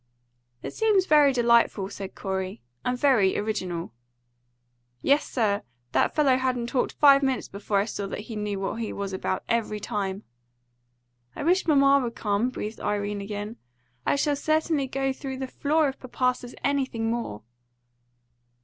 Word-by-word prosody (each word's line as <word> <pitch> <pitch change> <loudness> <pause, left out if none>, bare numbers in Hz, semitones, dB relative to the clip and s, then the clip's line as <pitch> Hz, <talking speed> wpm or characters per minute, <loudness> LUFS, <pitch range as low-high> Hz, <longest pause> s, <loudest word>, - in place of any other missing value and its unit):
"It - - -5
seems 425 -4 +3
very 295 -4 +6
delightful," 235 -5 +3
said 195 -1 -7
Corey, 190 - -4 0.2
"and 250 0 0
very 245 -8 +3
original." 185 - -3 1.1
"Yes, 285 +2 +3
sir. 210 -5 +1 0.3
That - - +2
fellow 280 -4 +4
hadn't 250 -2 -1
talked 250 - 0
five 280 -2 +6
minutes 265 -2 0
before 200 +1 -2
I 200 - +2
saw 205 -2 -4
that 205 - -5
he 220 +1 -8
knew 210 -2 -2
what 195 +3 -3
he 230 -2 -3
was 200 -1 -4
about 190 0 -2
every 225 -2 0
time." 205 -2 -3 1.1
"I - - -4
wish 360 +4 +2
mamma 280 -2 +5
would 235 -1 -4
come!" 210 +3 0
breathed 220 -3 -6
Irene 205 0 -1
again. 205 +2 -5 0.5
"I - - +2
shall 290 +1 +1
certainly 310 -1 +1
go 270 +1 -1
through 265 -1 -6
the 265 - -3
floor 295 +3 +1
if 270 - -8
papa 250 0 0
says 245 -1 -10
anything 260 -5 0
more." 230 - -4
235 Hz, 160 wpm, -26 LUFS, 205-275 Hz, 1.1 s, very